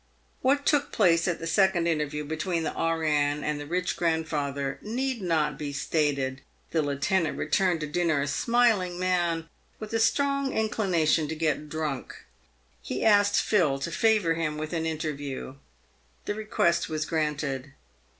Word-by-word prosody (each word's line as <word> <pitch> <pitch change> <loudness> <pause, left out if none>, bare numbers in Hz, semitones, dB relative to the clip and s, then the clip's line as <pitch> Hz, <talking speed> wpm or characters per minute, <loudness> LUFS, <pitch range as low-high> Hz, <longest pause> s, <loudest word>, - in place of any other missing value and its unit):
"What 280 +2 +2
took 290 -1 +2
place 170 -5 +3
at 175 - 0
the 165 - -7
second 190 0 +3
interview 150 -2 -1
between 160 +3 -2
the - - -1
E.N. 150 -3 0
and 150 -1 -1
the 145 - -7
rich 180 +2 -1
grandfather 150 -5 -1
need 250 +2 -2
not 155 -5 0
be 145 -2 -3
stated. 140 -3 -1 0.3
The 165 - +2
lieutenant 150 +4 0
returned 180 -4 +1
to - - -1
dinner 160 0 +1
a 140 - -1
smiling 220 - +2
man, 175 -3 0 0.3
with 215 0 -7
a 225 - +2
strong 275 +3 +1
inclination 180 -8 +1
to 160 - -4
get 155 -1 -1
drunk. 150 -4 -4 0.6
He 125 - -3
asked 205 -1 +5
Phil 165 -10 +2
to 140 +5 -4
favour 210 -2 +3
him 160 -2 -2
with 155 +2 -5
an 160 -1 -1
interview. 145 -4 -4 0.7
The - - -1
request 175 -5 0
was 155 -1 -2
granted. 145 -4 -2
165 Hz, 150 wpm, -27 LUFS, 150-190 Hz, 0.7 s, asked